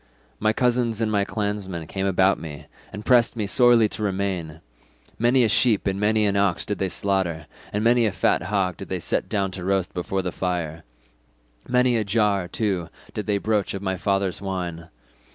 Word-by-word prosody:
My 110 - +2
cousins 120 -1 +1
and 110 -1 0
clansmen 100 -5 -3
came 95 +3 -3
about 95 0 +3
me, 75 -3 -8 0.3
and 105 +3 -8
pressed 120 -2 +4
me 110 -3 -2
sorely 120 +1 +5
to 110 - -6
remain; 95 -6 -2 0.6
many 120 +3 +4
a - - +4
sheep 110 0 +3
and 95 -1 -1
many 105 +1 +2
an 100 -1 +1
ox 100 -3 +1
did 105 - -3
they 95 - 0
slaughter, 90 -5 -1 0.3
and 105 +1 -1
many 120 0 +4
a - - 0
fat 95 - +1
hog 95 -1 -1
did 95 - -9
they 95 - -1
set - - -2
down 100 -3 0
to 95 -1 -7
roast 95 -1 0
before 95 +2 -2
the 90 - -2
fire; 85 -3 -3 0.8
many 125 -1 +3
a 110 - +1
jar, 100 -3 +1
too, 95 -4 -2 0.2
did 105 - -4
they 105 -1 +2
broach 105 -1 0
of 100 - -6
my 95 -1 -1
father's 95 -1 -1
wine. 90 -4 -4
100 Hz, 190 wpm, -24 LUFS, 95-110 Hz, 0.8 s, sorely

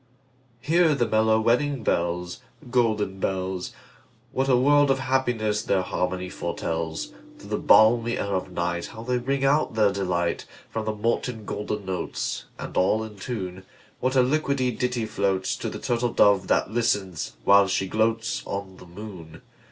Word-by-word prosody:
Hear 165 -1 +3
the 120 -3 +1
mellow 110 0 +3
wedding 125 +3 +1
bells, 85 -1 -1 0.3
Golden 110 -6 +1
bells! 95 -1 -2 0.6
What 135 0 0
a 125 - +5
world 145 +2 +4
of 135 - +3
happiness 120 -5 0
their 95 -2 +1
harmony 90 0 -2
foretells! 80 -2 -4 0.2
Through - - -13
the - - 0
balmy 115 +1 +5
air 100 - -2
of 95 - -1
nightHow 90 +5 -3
they 125 0 0
ring 135 +2 -1
out 140 -4 +2
their 105 -2 +4
delight! 90 -3 -1 0.2
From 110 -1 -3
the 110 0 -2
molten 115 +1 -2
golden 105 -1 -4
notes, 95 -1 -3
And - - -7
all 105 +4 +2
in 110 -2 -9
tune, 95 -4 -5 0.4
What 130 +1 0
a 130 - +6
liquid 140 +1 +1
ditty 125 -2 -1
floatsTo 95 -3 -1
the - - -5
turtle 120 0 -1
dove 100 -2 +4
that - - +1
listens, 105 -7 -1
while 100 +4 +6
she 95 0 0
gloatsOn 110 -3 -2
the 90 - -13
moon! 85 -4 -10
110 Hz, 150 wpm, -25 LUFS, 95-125 Hz, 0.6 s, a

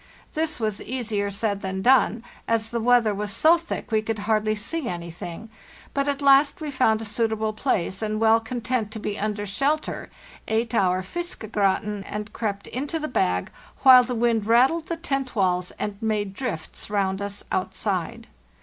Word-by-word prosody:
This 315 -2 0
was 215 -3 -1
easier 220 -5 -2
said 200 0 -1
than 190 0 -3
done, 245 -3 +4 0.2
as 225 -1 0
the 235 - -1
weather 235 -2 +4
was 205 +1 -3
so 315 +11 +5
thick 335 -7 -5
we 220 -1 +3
could 220 0 -3
hardly 215 0 +2
see 245 +7 -4
anything; 170 +3 -7 0.5
but 280 0 0
at 285 0 -1
last 275 +1 +5
we 305 -2 -4
found 225 -5 +2
a - - -5
suitable 220 0 -1
place, 195 -5 -1
and, 215 0 -1
well 225 0 +5
content 230 -1 -2
to 220 - -5
be 205 0 -4
under 210 0 -2
shelter, 275 +10 -1 0.4
ate 225 +1 0
our 185 -4 +2
'fiskegratin,' 210 - -2
and 210 +1 -5
crept 200 -3 -3
into 280 +6 -3
the 305 -1 -3
bag, 90 - 0 0.3
while 255 -2 +9
the 245 0 -3
wind 225 -2 +1
rattled 265 +8 +4
the 335 - -3
tent 275 -6 -2
walls 180 -3 +1
and 205 -1 -4
made 210 -3 -1
drifts 200 -9 -5
round 195 -1 0
us 200 0 -4
outside. 185 -2 -2
220 Hz, 170 wpm, -24 LUFS, 200-255 Hz, 0.5 s, while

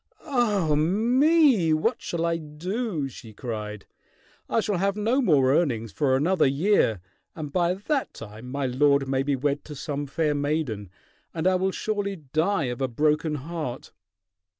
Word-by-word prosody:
"Ah 210 - +1
me! 230 - +4
What 225 +11 0
shall 170 -1 -2
I 170 0 +1
do?" 165 - -3
she 115 -4 -11
cried. 105 -3 -6 0.6
"I - - +2
shall 210 -3 0
have 195 +1 +1
no 230 +6 +2
more 140 - +4
earnings 120 -9 0
for 130 +7 +1
another 160 +3 +3
year, 140 - +2 0.3
and 150 -3 -6
by 175 0 +2
that 270 +8 -2
time 110 +3 -10
my 140 +1 -2
lord 140 +2 +2
may 135 0 +1
be 140 0 0
wed 140 +2 -1
to 150 - -8
some 145 +1 -4
fair 150 +2 0
maiden, 145 - -2 0.5
and 160 0 -2
I 185 - +4
will 185 +1 +1
surely 205 -1 -2
die 160 +5 0
of 125 0 -3
a 130 - +1
broken 150 +4 +1
heart!" 150 -3 -5
155 Hz, 160 wpm, -25 LUFS, 135-190 Hz, 0.6 s, me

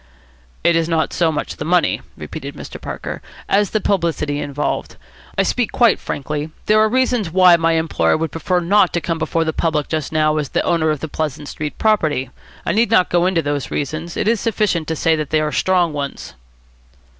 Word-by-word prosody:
"It 170 - +4
is 165 0 +1
not 160 -1 0
so 165 -2 +2
much 150 - -4
the - - -4
money," 175 +3 +2 0.2
repeated - - -7
Mr. - - -9
Parker, - - -6 0.3
"as 200 0 +2
the 215 - 0
publicity 165 -7 0
involved. 145 0 -3 0.4
I - - +4
speak 245 -3 0
quite 235 -4 +3
frankly. 150 +2 -4 0.2
There 215 0 +4
are 215 0 +4
reasons 250 -5 +1
why 180 0 +6
my 165 0 +2
employer 160 - +1
would 160 0 -2
prefer 180 +3 0
not 185 +1 +3
to 170 - +1
come 165 -1 -3
before 165 +1 0
the 160 -1 -2
public 155 -3 -1
just 155 -3 -2
now 155 -1 +2
as 150 -3 -2
the - - 0
owner 165 -2 +1
of 150 -2 -1
the 160 - -3
Pleasant 150 -1 -4
Street 150 -1 -5
property. 155 - +1 0.3
I - - +1
need 225 +1 +2
not 185 -5 +3
go 175 +1 +3
into 175 -3 +1
those 145 -1 -2
reasons. 155 +4 -4
It - - 0
is 230 -1 +2
sufficient 205 -8 0
to 160 - -1
say 160 +1 +2
that 155 -2 -3
they 155 - +2
are 155 0 -1
strong 180 -3 +2
ones." 140 - -5
165 Hz, 205 wpm, -19 LUFS, 150-185 Hz, 0.4 s, why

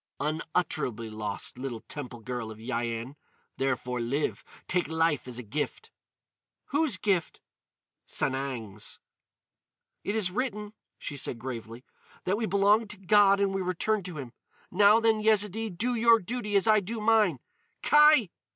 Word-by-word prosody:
"Unutterably 150 -7 -2
lost, 105 +2 -4
little 125 -4 -5
temple 125 -5 -7
girl 120 -1 -4
of 110 - -9
Yian. 115 +2 -3 0.4
Therefore, 125 -2 -1
live. 135 +6 -2 0.2
Take 180 0 +1
life 160 -4 0
as 125 -2 -5
a 125 - -5
gift!" 145 +8 -4 0.8
"Whose 290 -7 +2
gift?" 185 -4 0 0.7
"Sanang's." 125 -7 -3 1.1
"It 205 - -2
is 200 -5 +1
written," 210 -2 -3 0.2
she 145 - -6
said 130 -3 -1
gravely, 115 0 -7 0.4
"that 185 - +1
we 220 +1 -2
belong 200 +3 +3
to 210 - -6
God 200 +1 +4
and 200 -1 +1
we 195 - -1
return 185 +4 0
to 180 -4 -7
him. 130 -4 -7 0.4
Now 205 +4 +6
then, 225 -1 +2
Yezidee, 215 0 +1
do 225 +7 -2
your 230 0 +5
duty 210 +1 -4
as 200 +2 +4
I 215 -1 +6
do 220 +4 -5
mine! 215 -7 +3 0.5
Kai!" 300 - +6
180 Hz, 140 wpm, -28 LUFS, 125-210 Hz, 1.1 s, Now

